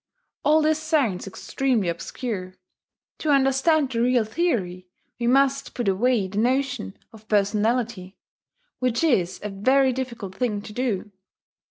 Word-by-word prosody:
All 310 +1 +4
this 310 0 +2
sounds 285 - 0
extremely 240 +1 -1
obscure: 185 +2 -4 0.6
to 310 - -2
understand 275 +1 +3
the 230 -2 0
real 245 -1 +3
theory 215 - -2 0.3
we 235 - -1
must 275 +2 +2
put 240 -4 -2
away 210 +1 +2
the 200 +2 -3
notion 250 - 0 0.2
of 220 -1 -15
personality, 210 -1 0 0.6
which 250 +2 0
is 190 - +1
a 210 - -3
very 260 +7 +2
difficult 235 -7 -5
thing 210 -1 -2
to 210 - -9
do. 225 -4 -2
235 Hz, 135 wpm, -24 LUFS, 200-270 Hz, 0.6 s, All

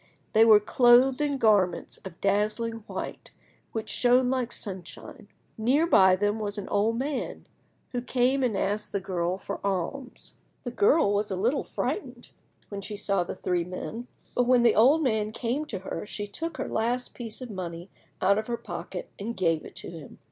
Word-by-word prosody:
They 220 +1 +6
were 215 -2 +8
clothed 245 +5 +5
in 285 -2 0
garments 205 -7 +2
of 185 -3 -10
dazzling 215 +3 0
white - - -6 0.4
which 220 -1 -4
shone 250 +1 +3
like 255 -2 -1
sunshine. 200 - -8 0.3
Near 265 +9 +3
by 190 - +6
them 205 +3 0
was 205 -1 -3
an 205 - -5
old 215 +3 +1
man, 275 +2 -3 0.5
who 245 - -2
came 255 +2 +1
and 240 -6 +1
asked 205 +2 -2
the 200 - +1
girl 185 -1 -2
for - - -6
alms. 200 +7 -4 0.3
The 245 - -4
girl 235 0 +3
was 205 +1 0
a 190 - -2
little 235 +10 +1
frightened 250 - -4 0.4
when 200 -1 -5
she 205 +1 -7
saw 195 -3 0
the 175 - -6
three 180 -1 -1
men, 220 +7 -6 0.3
but 245 -1 +1
when 250 -1 +5
the 235 -2 +5
old 280 +8 +5
man 220 -5 0
came 250 +6 -2
to 220 - -4
her 190 +2 -6
she 205 - -5
took 325 +12 -5
her - - -3
last 240 +3 -1
piece 230 -3 -6
of 250 -3 -7
money 175 -2 -6 0.3
out 200 +2 +4
of 215 - -5
her 235 -1 -2
pocket - - -7
and 230 +4 -4
gave 165 -4 +1
it - - -12
to - - -6
him. 160 -5 -11
220 Hz, 185 wpm, -27 LUFS, 195-245 Hz, 0.5 s, were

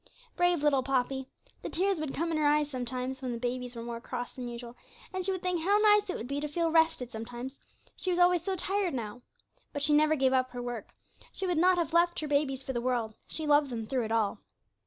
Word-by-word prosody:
Brave 355 -4 +2
little 285 -3 +4
Poppy! 265 0 -1 0.3
The - - -5
tears 380 0 +1
would 305 -3 -3
come 335 +2 -1
in 320 - 0
her 300 - +3
eyes 295 0 +2
sometimes, 255 +1 -3
when 255 -2 -3
the - - -3
babies 250 +1 -3
were 230 - -5
more 235 0 -5
cross 245 +1 -5
than 250 -2 -6
usual, 240 0 -7 0.4
and 370 0 -2
she 385 - 0
would 375 -1 -4
think 360 -2 0
how 400 +5 +4
nice 420 -1 +5
it - - -1
would 230 - -6
be 280 +2 -2
to 300 - -2
feel 330 +2 0
rested 320 -6 +3
sometimes; 240 +4 -7 0.4
she 370 - -3
was 355 - +1
always 355 -1 +5
so 380 +3 -2
tired 375 -2 0
now. 230 0 -5 0.5
But 285 - -2
she 295 +1 +4
never 305 +1 +5
gave 265 -2 +2
up 255 -1 +2
her 245 - -5
work; 240 -3 -6 0.4
she 385 - -4
would 355 -3 +1
not 365 +1 +5
have 335 -1 -1
left 345 +1 +3
her 305 - -3
babies 280 -2 +1
for 265 - -4
the 240 - -1
world; 240 -3 0
she 315 - -2
loved 290 -1 +4
them 230 -3 -4
through 250 0 -1
it 220 - -5
all. 225 -3 +1
285 Hz, 245 wpm, -30 LUFS, 245-340 Hz, 0.5 s, nice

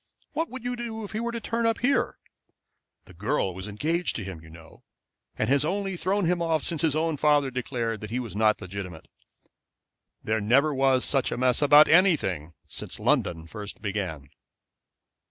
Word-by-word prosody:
What 325 0 -2
would 260 -2 -8
you 245 0 -2
do 230 -2 -5
if 205 - -7
he 215 - -3
were 235 +1 -2
to 235 - -4
turn 230 0 -1
up 225 - +1
here? 275 +3 +1 0.9
The 90 - -15
girl 95 0 -1
was 95 +3 -7
engaged 160 - -1
to 110 - -3
him, 95 -4 -7
you 80 - -14
know, 80 0 -15 0.5
and - - 0
has 140 +1 +3
only 195 +3 -2
thrown 190 +3 0
him 175 +1 +1
off 160 -3 +1
since 165 -3 -1
his 155 -3 +2
own 160 -1 0
father 145 -2 +3
declared 120 -3 -3
that 105 - -6
he 120 +3 -2
was 115 -7 -6
not 110 0 +3
legitimate. 90 -4 -7 1.2
There 110 0 0
never 135 +8 +3
was 135 -1 +3
such 135 -2 +2
a - - -2
mess 125 +1 +2
about 145 +1 +7
anything 95 - +3
since - - -6
London 80 -1 +1
first 105 +3 -8
began." 95 - -4
135 Hz, 185 wpm, -26 LUFS, -, 1.2 s, about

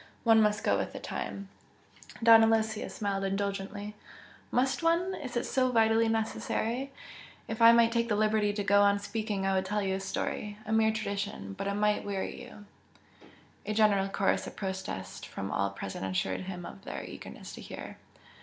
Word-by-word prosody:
one 225 -1 +6
must 210 -1 +2
go - - +2
with - - -3
the - - -6
time 200 0 -5 0.4
" - - -16
Don 225 -1 +9
Aloysius 220 -1 +1
smiled 200 -2 -1
indulgently. 200 +1 -3 0.6
"Must 260 +5 +1
one? 340 +3 +2
Is 255 -9 -5
it 240 - -1
so 255 -1 +1
vitally 225 -1 +4
necessary? 225 +3 -1 0.6
If 225 +1 -4
I 230 0 +10
might 235 0 +5
take 235 0 0
the 210 - +2
liberty 215 0 +2
to 205 0 -3
go 200 0 +5
on 200 0 +4
speaking 205 -1 -3
I 195 - +2
would 190 0 +2
tell 210 +1 0
you 190 -1 0
a 190 - -1
story 205 +1 -3
a 215 - -5
mere 220 0 +4
tradition 200 - -4
but 195 - -4
it 200 - -1
might 210 0 +1
weary 200 +3 -4
you 245 -4 -12 0.5
" - - -25
A 215 - -1
general 205 -3 +3
chorus 195 0 +1
of - - -9
protest 190 - -5
from 95 0 -5
all 100 0 +1
present 100 -1 -6
assured 95 0 -1
him 180 -2 -6
of 195 - -10
their - - -6
eagerness - - -9
to - - -9
hear. - - -8
210 Hz, 190 wpm, -30 LUFS, 195-225 Hz, 0.6 s, I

